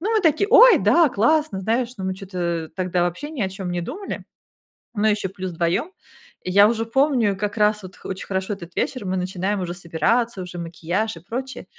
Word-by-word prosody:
Ну, 440 +5 0
мы 420 - +2
такие: 325 +5 +2
"Ой, - - +8
да, 335 -3 +4
классно", 235 -2 +1
знаешь, 230 +4 0
но 190 - -4
мы 190 0 -1
чё-то, 190 -1 -8
э, 170 -2 -1
тогда 180 -1 0
вообще 175 - -2
ни 275 -9 -3
о 190 - 0
чём 190 -1 -7
не 175 -1 -2
думали. 395 - -6 0.7
Ну, 210 0 -1
ещё 210 -2 0
плюс 185 -1 -4
вдвоём. 170 - -1 0.5
Я 200 +3 +5
уже 225 -1 0
помню 245 -5 +2
как 210 +2 -3
раз 210 0 +2
вот 185 +1 -11
хо - - -11
очень 190 0 -5
хорошо 190 +1 -2
этот 170 -2 -11
вечер: 255 -6 -2
мы 185 0 -1
начинаем 185 +2 -2
уже 175 -1 -4
собираться, 195 +5 0
уже 180 -1 -8
макияж 170 +5 -3
и - - -10
прочее. 260 +2 -5
200 Hz, 210 wpm, -22 LUFS, 180-240 Hz, 0.7 s, Ой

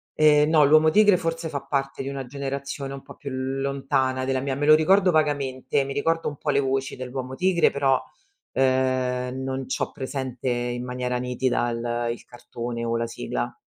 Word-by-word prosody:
Ehm, 150 0 +5
no, 155 -3 +5
"L'Uomo 155 +2 +6
Tigre" 205 +1 +5
forse 165 0 -3
fa 140 -2 -4
parte 135 -1 -2
di 135 - -4
una 135 -1 -5
generazione 140 +1 -5
un 135 - -7
po' - - -13
più 140 - -7
lontana 135 0 -1
della 130 0 0
mia. 135 -1 -2
Me 145 +1 -1
lo 155 - +8
ricordo 185 +4 +4
vagamente, 140 -3 0
mi 140 - -4
ricordo 165 +3 0
un 145 - -4
po' 150 - -4
le 140 - +3
voci 135 0 -1
dell'Uomo 130 0 -5
Tigre, 180 +1 +3
però, 135 -2 +2 0.5
ehm, 130 -1 0
non 130 0 -3
c'ho - - -2
presente 130 -2 -4
in 120 0 -2
maniera 125 0 -2
nitida 125 -1 0
il 120 0 -2
il 120 - -8
cartone 120 -1 -6
o 115 0 0
la 115 0 -1
sigla. - - -4
135 Hz, 185 wpm, -24 LUFS, 125-145 Hz, 0.5 s, lo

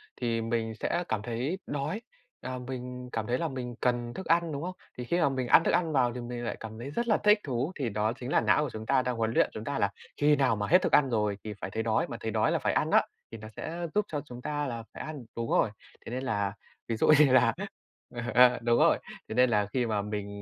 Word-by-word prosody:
thì 115 -2 -1
mình 115 0 -1
sẽ 175 - 0
cảm 110 -2 0
thấy 120 - -2
đói, 150 +9 -3 0.4
à, 130 0 -4
mình 125 -1 -6
cảm 110 -1 -3
thấy 120 +1 +1
là 165 - -1
mình 125 -4 -5
cần 120 -1 0
thức 190 - -7
ăn, 170 0 +2
đúng 140 -1 -4
không? 185 +1 -4 0.2
Thì 125 - -4
khi 170 +8 0
mà 160 - +4
mình 130 -2 -2
ăn 165 - +7
thức - - +2
ăn 165 -3 +1
vào 125 -3 +2
thì 125 - -5
mình 120 0 -5
lại - - -3
cảm 110 0 -8
thấy 125 +4 -6
rất 235 +9 -2
là 215 - +4
thích 210 0 +4
thú 130 +3 -2
thì 135 -5 -2
đó 105 +1 0
chính 125 +2 -5
là - - +4
não 150 - +3
của 150 - -2
chúng 110 -1 -7
ta 135 +2 +3
đang 125 -1 -2
huấn 115 -1 0
luyện - - +3
chúng 110 - -6
ta 140 +3 -2
là 100 - +2 0.3
khi 150 0 +4
nào 135 -5 +2
mà 105 -1 -2
hết 180 +3 +5
thức - - 0
ăn 135 -3 +5
rồi 105 -3 0
thì 105 -1 -5
phải - - -4
thấy 110 +2 -2
đói 110 0 +1
mà 115 - -6
thấy 110 -1 -3
đói 110 0 +2
là - - +1
phải - - 0
ăn - - +1
á, - - +5 0.3
thì 115 - -7
nó 110 0 -9
sẽ 170 +2 -4
giúp 210 - +3
cho 145 -2 -3
chúng 125 -3 -9
ta 145 +1 -2
là 115 -2 -5
phải - - -7
ăn 150 -5 -7
đúng 115 0 -3
rồi, - - +3 0.4
thế - - -7
nên 130 +2 -3
là, 100 -5 -1 0.3
ví 115 - -1
dụ - - +2
như 145 -4 +6
là, 130 - +5 0.6
ờ, 120 - -3
ờ, 125 0 +6
đúng 120 0 +3
rồi, - - +5 0.3
thế 110 - -4
nên 125 +1 +5
là 105 -3 +2
khi 125 -2 +1
mà 110 -3 0
mình 105 0 -4
125 Hz, 280 wpm, -29 LUFS, 115-140 Hz, 0.6 s, ăn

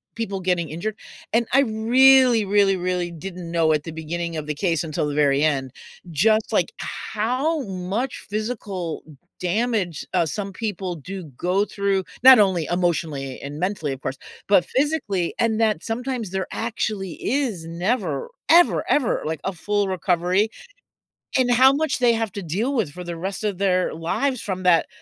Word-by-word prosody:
people 200 -4 -3
getting 180 -4 0
injured, 205 +7 -4 0.4
and 235 0 +3
I 270 - +5
really, 245 0 +5
really, 195 -1 +3
really 180 -1 -2
didn't 175 +1 -7
know 165 -2 +3
at 150 -1 0
the 165 - -6
beginning 165 +1 -4
of 150 - -4
the 150 - -1
case 165 -1 0
until 150 -1 -2
the 145 - -3
very 145 -1 +3
end, 135 -4 0 0.4
just, 215 +7 +2
like, - - +2
how 255 +8 -2
much 195 +6 -4
physical 205 -6 -4 0.4
damage, 190 - -1
uh, 175 -2 +3
some 195 +5 -4
people 190 -4 -3
do 185 +4 -7
go 185 +3 +1
through- 200 -2 -1 0.2
not 260 -2 +10
only 190 -6 +3
emotionally 160 -6 -1
and 145 +2 -7
mentally, 180 -6 -1
of 135 - -5
course- 130 0 -4 0.3
but 195 -3 +5
physically, 260 - 0
and 225 -1 +1
that 215 -7 +1
sometimes 240 -1 -3
there 190 0 -3
actually 215 -5 -3
is 240 - -1
never, 175 - -2 0.2
ever, 345 +2 +4
ever 265 -7 +2
like 160 0 -3
a 195 - -1
full 205 +3 -1
recovery 185 +2 +1 0.9
and 250 -1 +2
how 260 +2 +7
much 305 -1 0
they 240 -1 +4
have 225 -3 -2
to 200 - -5
deal 210 - -1
with 210 - 0
for 180 +3 -8
the 175 0 -5
rest 190 +5 -4
of 200 -3 -2
their 185 -2 +1
lives 245 - -1
from 185 -2 -4
that, 175 -3 +4
190 Hz, 170 wpm, -23 LUFS, 170-225 Hz, 0.9 s, not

